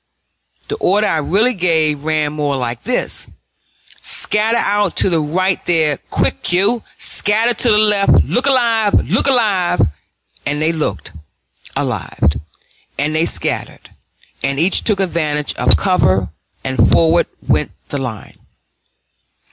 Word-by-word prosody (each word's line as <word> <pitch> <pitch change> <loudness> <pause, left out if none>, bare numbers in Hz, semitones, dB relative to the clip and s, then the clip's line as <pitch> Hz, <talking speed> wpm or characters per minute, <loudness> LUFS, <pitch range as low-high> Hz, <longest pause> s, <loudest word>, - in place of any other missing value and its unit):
The 435 - -4
order 205 - +1
I 165 - 0
really 205 - +1
gave 160 -6 0
ran 155 -2 0
more 145 -2 -2
like 120 -2 -4
this: 250 +1 -1 0.7
"Scatter 220 +2 +1
out 205 -4 0
to 190 - +2
the 165 - +2
right 185 +5 -1
there, 160 -4 +2
quick, - - -1
you! 200 +6 +3 0.2
scatter 220 +4 +1
to 240 +2 0
the 210 - +4
left! 210 -2 +4
look 250 +4 -1
alive, 230 -5 +2
look - - +1
alive!" 205 -9 +2 0.6
And 145 +1 -2
they 155 +1 +1
looked 160 -2 -4 0.6
alive, 75 - -1 0.6
and 150 +2 -1
they 160 +1 +1
scattered, - - -4 0.5
and 140 0 -1
each 180 +4 +3
took 210 -3 0
advantage 155 -5 -1
of - - +3
cover, 95 - +1 0.3
and 130 -4 +1
forward 165 +1 +3 0.2
went - - +1 0.2
the 145 - -3
line. 115 -6 -7
175 Hz, 130 wpm, -16 LUFS, 150-210 Hz, 0.7 s, the